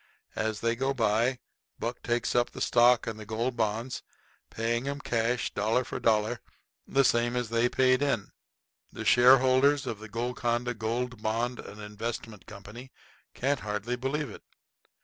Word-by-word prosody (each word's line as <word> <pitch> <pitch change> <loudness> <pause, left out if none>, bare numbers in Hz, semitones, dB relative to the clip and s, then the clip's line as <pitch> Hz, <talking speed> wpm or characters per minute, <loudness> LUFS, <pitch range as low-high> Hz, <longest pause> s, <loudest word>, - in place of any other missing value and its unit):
As 110 -1 -2
they 115 0 +1
go 135 +3 -1
by, 115 +2 +2 0.4
Buck 120 +1 -4
takes 120 -1 -1
up 120 0 +2
the - - -10
stock 120 0 +4
and 110 -1 -5
the - - -7
Gold 115 +3 -2
Bonds, 115 +2 -2 0.5
paying 120 +3 -1
'em 140 0 -3
cash, 120 -1 -1
dollar 110 +5 +1
for - - -5
dollar, 110 +1 +2 0.5
the 135 - +3
same 120 +1 +2
as 125 -2 -1
they 115 +1 +2
paid 130 +1 +3
in. 140 -8 0 0.6
The - - -7
shareholders 130 +3 +5
of 110 - -4
the 110 0 -10
Golconda 120 +1 -1
Gold 115 +1 -3
Bond 115 +3 -1
and 105 - -9
Investment 105 0 -6
Company 110 +5 -11 0.4
can't 140 +2 0
hardly 105 +3 -3
believe 135 +1 -2
it. - - -11
120 Hz, 155 wpm, -28 LUFS, 110-125 Hz, 0.6 s, shareholders